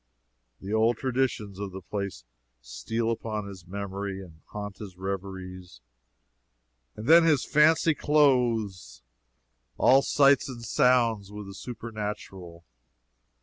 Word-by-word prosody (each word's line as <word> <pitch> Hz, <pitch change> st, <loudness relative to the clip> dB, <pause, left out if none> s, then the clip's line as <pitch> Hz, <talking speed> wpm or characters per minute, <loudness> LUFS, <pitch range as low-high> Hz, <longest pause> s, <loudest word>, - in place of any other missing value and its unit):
The 100 Hz, +2 st, -6 dB
old 110 Hz, +1 st, +3 dB
traditions 120 Hz, -7 st, -2 dB
of 100 Hz, -1 st, -4 dB
the 95 Hz, -, -7 dB
place 100 Hz, -10 st, -5 dB, 0.4 s
steal 65 Hz, -, -3 dB
upon 110 Hz, -2 st, -4 dB
his 95 Hz, -3 st, -11 dB
memory 100 Hz, 0 st, -5 dB
and 85 Hz, -4 st, -13 dB
haunt 105 Hz, -1 st, -7 dB
his 95 Hz, -4 st, -9 dB
reveries, 95 Hz, -3 st, -6 dB, 1.2 s
and 105 Hz, -, -8 dB
then 165 Hz, +5 st, +7 dB
his 155 Hz, -5 st, +3 dB
fancy 160 Hz, +2 st, +4 dB
clothes 115 Hz, -, +1 dB, 0.7 s
all 135 Hz, +1 st, +5 dB
sights 140 Hz, -1 st, +3 dB
and 120 Hz, -3 st, -8 dB
sounds 115 Hz, -5 st, +2 dB
with 105 Hz, 0 st, -8 dB
the 100 Hz, -, -9 dB
supernatural. 105 Hz, -7 st, -7 dB
105 Hz, 115 wpm, -27 LUFS, 95-120 Hz, 1.2 s, then